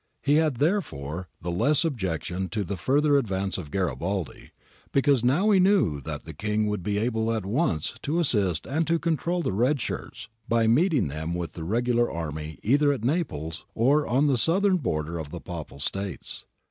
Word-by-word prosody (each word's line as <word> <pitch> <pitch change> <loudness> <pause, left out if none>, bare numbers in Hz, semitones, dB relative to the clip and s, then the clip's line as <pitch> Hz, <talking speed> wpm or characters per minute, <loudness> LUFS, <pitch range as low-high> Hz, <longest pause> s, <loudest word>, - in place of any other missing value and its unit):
He 145 +2 +4
had, 155 -4 +2
therefore, 95 - -1
the 85 - -2
less 145 - +2
objection 95 - -2
to 105 -2 -2
the 100 +2 -4
further 145 - +3
advance 95 -5 -2
of 80 -5 -8
Garibaldi, 95 0 -3 0.4
because 140 -2 +3
he 120 - +2
now 180 +12 +3
knew 185 - +3
that 75 0 -6
the 80 - -8
King 105 +6 -1
would 105 -2 -1
be 100 +3 -1
able 110 0 0
at 110 -4 -2
once 110 - 0
to 155 +4 0
assist 100 - +1
and 155 +6 -1
to 165 +1 +3
control 170 +1 -1
the - - -1
red 125 +8 +2
shirts, - - -5 0.2
by 115 -1 +3
meeting 145 - +3
them 80 +4 -4
with 85 -1 -4
the 80 - -6
regular 120 +5 +1
army 75 -2 -5
either 145 +5 +4
at 135 -6 -3
Naples 80 - -2
or 140 +6 +3
on 130 +6 +3
the 135 -4 +3
southern 190 - +3
border 80 - -2
of 75 -2 -6
the - - -6
Papal - - -7
States. 95 +5 -4
110 Hz, 185 wpm, -26 LUFS, 85-145 Hz, 0.4 s, He